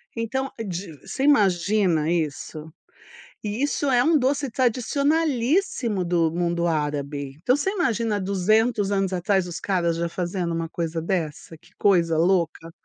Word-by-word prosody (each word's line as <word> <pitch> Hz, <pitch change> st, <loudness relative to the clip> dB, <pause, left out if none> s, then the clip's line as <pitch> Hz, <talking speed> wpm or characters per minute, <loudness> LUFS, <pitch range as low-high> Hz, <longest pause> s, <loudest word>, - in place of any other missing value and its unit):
Então 265 Hz, +4 st, -2 dB, 0.2 s
de 180 Hz, -1 st, -5 dB, 0.2 s
você 265 Hz, -, -3 dB
imagina 190 Hz, -, +3 dB
isso? 155 Hz, -1 st, -3 dB, 0.7 s
E 210 Hz, +4 st, -3 dB
isso 290 Hz, 0 st, 0 dB
é 245 Hz, -1 st, +4 dB
um 315 Hz, 0 st, +4 dB
doce 275 Hz, +2 st, 0 dB
tradicionalíssimo 260 Hz, -, +1 dB
do 170 Hz, -2 st, +1 dB
mundo 170 Hz, 0 st, 0 dB
árabe, 145 Hz, -3 st, -2 dB
então 250 Hz, -, +3 dB
você 295 Hz, +7 st, -1 dB
imagina 235 Hz, -, 0 dB
há -, -, -1 dB
200 205 Hz, +2 st, +1 dB
anos 195 Hz, -1 st, 0 dB
atrás 190 Hz, +1 st, +1 dB
os 170 Hz, -, -5 dB
caras 175 Hz, -4 st, 0 dB
já 170 Hz, 0 st, -1 dB
fazendo 175 Hz, 0 st, -3 dB
uma 165 Hz, 0 st, -2 dB
coisa 165 Hz, 0 st, -3 dB
dessa? 165 Hz, -2 st, -3 dB
Que 170 Hz, +3 st, -23 dB
coisa 170 Hz, -5 st, +3 dB
louca. 165 Hz, -1 st, +1 dB
190 Hz, 145 wpm, -24 LUFS, 170-235 Hz, 0.7 s, é